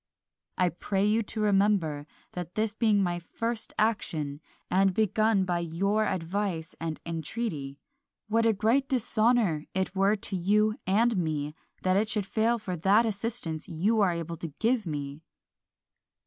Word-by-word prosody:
I 180 -1 +3
pray 195 +3 -1
you 215 +2 +3
to 215 0 -4
remember, 195 -8 +2 0.2
that 180 -1 -6
this 215 -1 0
being 215 -3 +3
my 175 -1 -1
first 230 +6 -4
action, 155 -9 -1 0.3
and 190 0 +2
begun 215 -1 +2
by 175 -1 0
your 195 +6 0
advice 175 -1 -2
and 160 -1 -4
entreaty, 165 -4 -4 0.5
what 225 +1 +2
a - - +5
great 230 +7 +1
dishonour 225 - +2
it 190 0 -1
were 195 +2 +3
to 200 -1 -5
you 210 +4 +2
and 225 +4 +3
me 150 -4 -1 0.3
that 185 0 +3
it 215 +2 +1
should 210 -2 -1
fail 225 +4 +1
for 195 -5 -4
that 200 +7 +4
assistance 205 -6 -3
you 195 +7 +1
are 190 -3 +4
able 170 0 -4
to 165 - -5
give 230 -3 +1
me! 145 -1 -4
195 Hz, 150 wpm, -28 LUFS, 170-220 Hz, 0.5 s, a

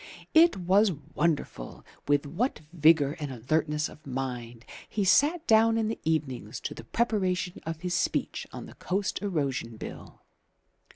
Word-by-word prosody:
It 330 - +6
was 190 +3 +3 0.2
wonderful 150 - -2 0.2
with 145 0 +2
what 185 - -2
vigour 155 -3 +4
and 145 -3 -4
alertness 150 +5 0
of 150 - -15
mind 125 -3 -5 0.2
he 205 -2 -1
sat 305 - +4
down 225 +1 +5
in 220 -1 0
the 225 - -4
evenings 135 -9 -2
to - - -4
the - - -10
preparation 190 -6 -1
of 165 -1 -4
his 180 -1 -2
speech - - -1
on - - -7
the - - -12
Coast 195 0 -2
Erosion 140 - -2
Bill. - - -9
160 Hz, 150 wpm, -28 LUFS, 140-205 Hz, 0.2 s, It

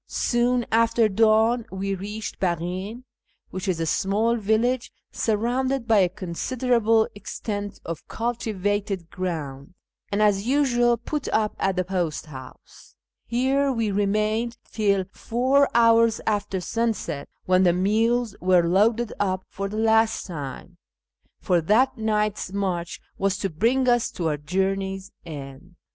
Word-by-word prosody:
Soon 240 0 +1
after 230 0 +3
dawn 220 +3 +3
we 195 +1 -2
reached 205 +3 -6
Baghin 185 +6 -2 0.5
(which 190 +2 -5
is 180 -3 0
a 165 - 0
small 210 +8 +1
village 230 +3 0 0.2
surrounded 245 +3 0
by 220 -3 +5
a 185 -2 +4
considerable 225 +4 +1
extent 205 0 -5
of 165 -1 -6
cultivated 205 -5 -2
grouudj, 155 -5 -5 0.4
and, 200 - 0
as 210 0 +2
usual, 240 -3 +3
put 290 +5 -4
up 215 -1 0
at 195 -1 +1
the 185 - +1
post 175 -5 -2
house. 130 -4 -13 0.3
Here 265 +4 +1
we 230 -4 -1
remained 215 +4 0
till 200 -3 +1
four 260 +4 +2
hours 230 -1 +5
after 205 -3 -1
sunset, 225 -8 -2 0.2
when 185 0 +4
the 180 -2 +5
mules 220 +5 +1
were 180 -1 +4
loaded 215 +6 +2
up 185 -2 -1
for 195 0 -4
the 215 - -5
last 225 0 +2
time, 165 +1 -7 0.6
for 180 -3 +1
that 215 +11 +3
night's 210 -3 -1
march 185 -4 -2 0.2
was 195 0 +1
to 195 -2 -2
bring 240 +11 +1
us 240 -1 +3
to 165 -3 -1
our 150 - -1
journey's 190 +4 -2 0.2
end. 145 +3 -9
210 Hz, 135 wpm, -24 LUFS, 185-230 Hz, 0.6 s, by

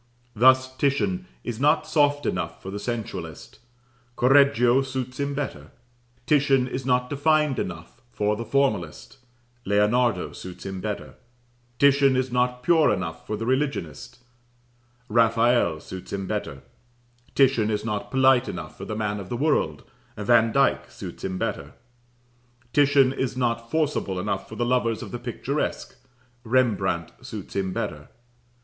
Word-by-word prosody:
Thus, 130 +3 +4
Titian 185 +7 0 0.2
is 120 -2 -5
not 150 +3 +3
soft 145 -2 +2
enough 85 -4 -2
for 95 - -6
the 100 - -5
sensualist, 100 -9 -6 0.6
Correggio 130 -1 +5
suits 130 -1 -5
him 140 0 -2
better; 145 -1 -5 0.6
Titian 140 -3 +3
is 130 0 -5
not 125 -1 +2
defined 150 0 +1
enough 85 +6 -6
for 105 +1 0
the 115 - -5
formalist, 110 - -1 0.4
Leonardo 105 +4 +1
suits 90 0 -10
him 95 -1 -5
better; 105 0 -5 0.6
Titian 140 -1 +4
is 130 0 0
not 125 0 0
pure 160 +1 +4
enough 80 -3 -4
for 105 - -2
the 115 - -4
religionist, 120 - -2 0.9
Raphael 115 -6 +3
suits 95 +3 -9
him 95 -1 -3
better; 70 -6 -4 0.7
Titian 130 -6 +3
is 105 0 -2
not 105 -2 -3
polite 130 -1 +4
enough 80 -3 -7
for 95 - -8
the 110 - -4
man 105 -1 -2
of 95 -2 -8
the 120 - -3
world, 150 +3 0 0.3
Vandyke 115 +1 +3
suits - - -9
him 95 -1 -3
better; 70 -4 -4 1.0
Titian 140 -2 +4
is 130 -2 -3
not 115 -2 -1
forcible 150 -12 -1
enough 100 0 -3
for - - -8
the 120 - -1
lovers 120 -2 0
of - - -9
the 120 - -5
picturesque, 125 +4 -3 0.5
Rembrandt 105 -9 +1
suits - - -8
him 95 -1 -1
better. - - -4
120 Hz, 140 wpm, -25 LUFS, 100-135 Hz, 1.0 s, Correggio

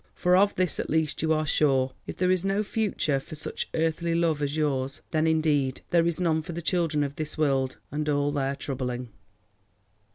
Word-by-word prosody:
For 180 0 +3
of 200 +2 +4
this 180 -3 0
at - - -3
least 160 -1 0
you 160 0 +1
are 155 0 +2
sure. 135 -3 +2
If - - -6
there 180 0 +2
is 185 -1 +1
no 195 +2 +1
future 200 -10 0
for 145 - -10
such 155 - -5
earthly 165 +1 0
love 165 -3 +1
as 145 +1 -1
yours, 135 -3 -1
then 155 0 +2
indeed 150 -5 +1
there 170 -1 +4
is 170 0 -1
none 160 -3 +2
for 170 - -7
the 170 - -4
children 165 -4 +1
of 140 0 -4
this 155 0 -3
world 135 -4 +1
and 150 +1 -2
all 145 0 +1
their 140 -1 -1
troubling. 125 -3 -4
155 Hz, 200 wpm, -27 LUFS, 140-170 Hz, -, of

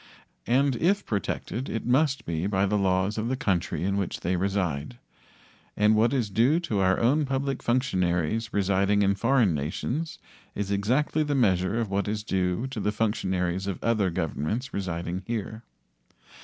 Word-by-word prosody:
And 135 +2 +3
if 195 - +1
protected 110 +4 -3
it 115 - -3
must 130 0 +2
be 85 +2 -2
by 100 -1 +1
the 105 +1 0
laws 95 +1 +1
of 110 - -2
the 130 - 0
country 95 -9 -1
in 100 +1 0
which 100 -3 -3
they 90 +2 0
reside. 95 - -1 0.8
And 105 +1 +4
what 115 +2 +3
is 120 -7 -1
due 125 - +3
to 110 - -1
our 95 0 +3
own 140 +7 +3
public 135 -1 -2
functionaries 110 - 0
residing 100 0 +2
in 100 0 +3
foreign 115 -1 +2
nations 125 - -3 0.4
is 100 -1 -3
exactly 125 +10 +1
the 145 -1 0
measure 100 -3 +2
of 110 -4 -2
what 100 +1 0
is 105 0 -2
due 95 +2 0
to 130 -4 -5
the 105 - 0
functionaries 95 -4 -1
of 95 - -2
other 110 -5 +2
governments 90 - -3
residing 90 -1 -3
here. 110 -1 -4
105 Hz, 165 wpm, -26 LUFS, 95-120 Hz, 0.8 s, And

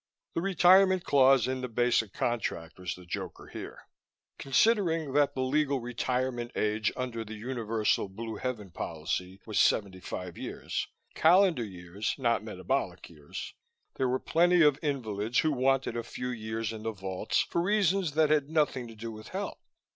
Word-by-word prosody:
The 165 - -1
retirement 185 0 +5
clause 135 -3 +5
in 130 0 -2
the 125 - -3
basic 115 -3 +1
contract 95 -10 -2
was 90 -1 -4
the 90 - -13
joker 85 - -6
here. - - -8 0.6
Considering 165 - +2
that 145 0 +3
the 130 - 0
legal 140 +1 +1
retirement 125 0 -2
age 105 0 +1
under 125 -3 -3
the 110 0 -8
universal 115 -3 -1
Blue 110 +2 -6
Heaven 110 -7 -4
policy 85 +4 -4
was 110 -2 -1
seventy 95 -3 +2
five 90 -1 -6
years - - -4 0.3
calendar 175 -4 +4
years, 95 0 -4
not 115 -6 +1
metabolic 95 -3 -3
years 75 -3 -8 0.4
there 130 -1 +1
were 130 - +2
plenty 175 +4 +4
of 145 -2 +4
invalids 115 -7 -2
who 155 - +1
wanted 135 -2 +1
a 120 - -1
few 125 +2 -5
years 110 -1 -3
in 110 - -7
the 110 0 -3
vaults 95 -2 -1
for 170 - -1
reasons 195 -3 +2
that 155 0 +3
had 150 -2 +2
nothing 150 -6 +1
to 115 - -11
do 115 +1 -6
with 110 0 -10
health. - - -5
120 Hz, 160 wpm, -29 LUFS, 105-145 Hz, 0.6 s, retirement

